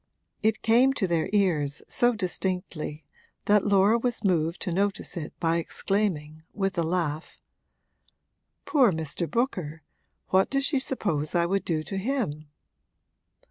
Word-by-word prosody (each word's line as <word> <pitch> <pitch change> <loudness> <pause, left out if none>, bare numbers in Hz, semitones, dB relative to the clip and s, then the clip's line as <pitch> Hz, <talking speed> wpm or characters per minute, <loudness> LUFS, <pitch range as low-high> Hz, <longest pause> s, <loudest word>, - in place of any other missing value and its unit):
It 220 0 +1
came 245 +4 +4
to 225 -8 0
their 170 -3 0
ears 165 -8 +1
so 240 0 +2
distinctly 180 -6 -3 0.4
that 210 0 +3
Laura 200 +3 +4
was 240 0 -2
moved 170 -3 +1
to 180 - -2
notice 200 +3 -1
it 160 -4 -5
by 165 0 +1
exclaiming, 165 -4 -1
with 195 -2 -1
a - - +3
laugh: 165 -2 -2 1.3
'Poor 260 -8 +4
Mr. 160 +1 -3
Booker, 180 - -2 0.5
what 190 +1 +3
does 275 0 +1
she 285 -3 +2
suppose 170 - -1
I 170 0 +3
would 195 +3 0
do 155 -3 -1
to 195 - -5
him?' 195 - -2
185 Hz, 140 wpm, -26 LUFS, 160-215 Hz, 1.3 s, came